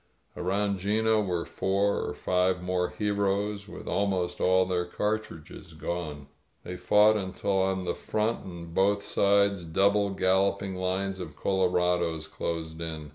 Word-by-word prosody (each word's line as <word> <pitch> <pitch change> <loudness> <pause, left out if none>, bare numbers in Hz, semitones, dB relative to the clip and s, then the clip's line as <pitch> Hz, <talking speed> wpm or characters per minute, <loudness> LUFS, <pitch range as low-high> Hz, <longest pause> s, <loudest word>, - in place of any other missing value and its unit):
Around 100 +2 0
'Gino 110 +3 +2
were 90 -4 -2
four 100 +1 0
or - - -4
five 90 0 +1
more 90 0 0
heroes, 100 0 -1
with - - -10
almost 95 -3 -1
all 95 0 +4
their 90 -1 0
cartridges 105 -5 -4
gone. 80 -3 -4 0.4
They 90 - -6
fought 105 +3 +4
until 95 0 -1
on 95 -1 0
the 85 - 0
front 110 +2 -2
and 85 -2 -8
on - - -12
both 100 +2 +2
sides 100 -2 +2
double 100 +4 +2
galloping 95 +1 +1
lines 95 +1 -2
of 80 -5 -7
colorados 90 -4 +1
closed 80 -1 -4
in. 80 -2 -5
95 Hz, 140 wpm, -28 LUFS, 90-100 Hz, 0.4 s, all